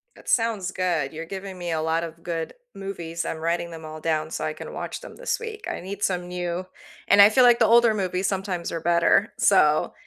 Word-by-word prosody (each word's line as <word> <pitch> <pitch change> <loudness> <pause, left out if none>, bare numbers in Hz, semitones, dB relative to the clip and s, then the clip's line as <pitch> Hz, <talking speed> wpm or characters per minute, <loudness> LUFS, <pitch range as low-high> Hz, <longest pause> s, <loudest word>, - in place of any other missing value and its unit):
That - - -11
sounds 220 -6 +1
good, 165 -6 -1
you're 160 +1 -6
giving 190 +1 -7
me 175 -1 -4
a 160 -1 0
lot 160 +1 0
of 165 0 -8
good 165 -2 -3 0.2
movies. 170 -4 -5
I'm 160 - -3
writing 170 +1 -2
them 160 -1 -9
all 155 0 -8
down 155 0 -1
so - - -3
I 155 - -2
can - - -9
watch - - -5
them - - -11
this - - -2
week, 445 -2 -7
I - - -4
need 200 +3 -6
some 180 -2 0
new 180 0 -3 0.4
and 200 0 +7
I 205 - +9
feel 255 +3 +4
like 240 -1 +6
the 225 - +5
older 230 0 +5
movies 190 -1 -1
sometimes 190 -3 -3
are 165 -1 -4
better, 170 +5 +3
so 155 -6 +3
180 Hz, 225 wpm, -24 LUFS, 165-200 Hz, 0.4 s, I